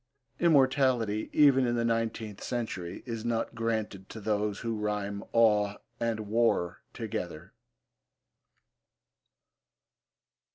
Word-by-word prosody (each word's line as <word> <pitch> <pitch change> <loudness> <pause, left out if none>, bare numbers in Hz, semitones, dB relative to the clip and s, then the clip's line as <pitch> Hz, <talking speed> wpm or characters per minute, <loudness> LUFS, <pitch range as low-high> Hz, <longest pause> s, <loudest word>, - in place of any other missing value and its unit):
Immortality, 130 -8 +3
even 135 -4 +5
in 120 - +1
the 115 0 +1
nineteenth 115 -2 -2
century, 95 -8 -4
is 115 -3 -4
not 115 -1 -1
granted 110 -4 -2
to 115 - -8
those 105 -1 -1
who 115 -1 -2
rhyme 105 -1 -2
'awe' 105 -3 +4 0.2
and 115 -2 -1
'war' 110 -5 +1
together. 90 -4 -5
110 Hz, 95 wpm, -29 LUFS, 105-120 Hz, 0.2 s, even